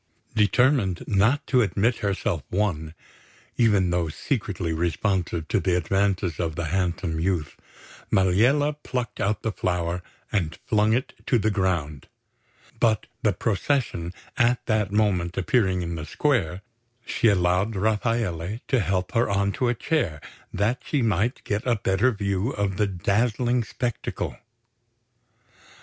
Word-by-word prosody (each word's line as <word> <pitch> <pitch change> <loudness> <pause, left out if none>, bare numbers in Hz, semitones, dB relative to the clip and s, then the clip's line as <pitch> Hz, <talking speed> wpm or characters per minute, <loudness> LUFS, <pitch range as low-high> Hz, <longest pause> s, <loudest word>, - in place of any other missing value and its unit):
Determined 110 -2 +2
not 110 +8 +2
to 130 -2 +3
admit 110 +2 +1
herself 100 -6 -1
won, 85 -5 -1 0.6
even 100 -6 +3
though 85 -2 0
secretly 95 - -2
responsive 85 0 -1
to - - +2
the 90 -2 +1
advances 95 -2 0
of 80 -3 -1
the 85 - -2
handsome 90 -3 -1
youth, 85 -5 -1 0.5
Maliella 120 +11 +3
plucked 125 -4 -4
out 105 +2 0
the 110 - 0
flower 90 -2 -1 0.3
and 85 -6 -1
flung 105 0 +3
it 125 +3 -1
to 125 - +4
the 110 0 +1
ground; 85 -8 -1 0.7
but 110 -2 +2 0.2
the 105 - +3
procession 100 -3 -1 0.3
at 120 -1 +2
that 110 -4 +1
moment 95 -5 +1
appearing 95 -2 +2
in 85 0 -3
the 80 -2 -5
square, 100 - 0 0.4
she 115 - +1
allowed 95 +2 +2
Rafaele 105 -2 0
to 130 - +3
help 95 -2 -1
her 115 -1 +2
on 100 0 +1
to 125 - -1
a 120 - +1
chair 110 - -1 0.3
that 110 +6 0
she 145 -5 0
might 110 +4 0
get 105 0 -1
a 120 - +3
better 105 +4 +2
view 100 0 -1
of 100 -6 -2
the 105 - +2
dazzling 115 +6 +1
spectacle. 120 +1 -3
100 Hz, 135 wpm, -25 LUFS, 90-115 Hz, 0.7 s, to